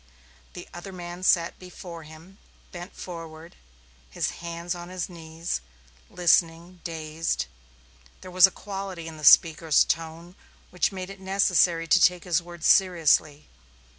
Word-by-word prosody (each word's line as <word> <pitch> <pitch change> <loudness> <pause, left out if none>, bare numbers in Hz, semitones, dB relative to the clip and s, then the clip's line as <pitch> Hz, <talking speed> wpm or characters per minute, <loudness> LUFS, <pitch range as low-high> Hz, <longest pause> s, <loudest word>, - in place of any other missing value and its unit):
The - - -10
other 175 +3 -8
man 175 -1 -8
sat 170 -2 +2
before 180 -2 -10
him, 160 +5 -15 0.3
bent 175 +1 -9
forward, 165 -1 -9 0.5
his - - -2
hands 170 +1 -4
on 175 0 -9
his 185 -2 -4
knees, 165 - -5 0.5
listening, 170 0 +1
dazed. 160 - -3 0.8
There 185 - -10
was 185 +1 +7
a - - -7
quality 195 -4 -7
in 160 -1 -9
the 155 - -11
speaker's 160 +1 +6
tone 165 +2 -4 0.4
which 180 +2 0
made 185 0 -7
it 195 - -12
necessary 190 -3 +2
to 175 +3 +4
take 180 0 +3
his 175 -1 +1
words 170 -1 -9
seriously. 160 -5 +3
175 Hz, 135 wpm, -25 LUFS, 165-180 Hz, 0.8 s, was